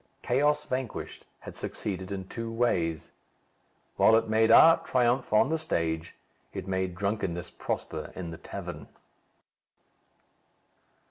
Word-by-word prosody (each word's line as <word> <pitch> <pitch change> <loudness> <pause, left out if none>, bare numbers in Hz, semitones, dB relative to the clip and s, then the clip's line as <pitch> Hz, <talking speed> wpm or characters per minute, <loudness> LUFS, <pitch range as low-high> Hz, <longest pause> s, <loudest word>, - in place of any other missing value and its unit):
"Chaos 145 +4 +2
Vanquished" 130 -3 -5
had - - -9
succeeded 95 -2 -5
in 95 -1 -5
two 115 +2 -5
ways. 90 -9 0 0.9
While 110 - +6
it 115 - +2
made 110 +1 +3
art 165 +8 +7
triumph 125 0 +1
on 110 +5 +4
the 160 0 0
stage, 80 - -2 0.4
it - - -6
made 95 -1 -1
drunkenness 95 -3 -2
prosper - - -4
in 85 -3 -5
the 80 - -9
tavern. - - -7
105 Hz, 120 wpm, -28 LUFS, 90-120 Hz, 0.9 s, art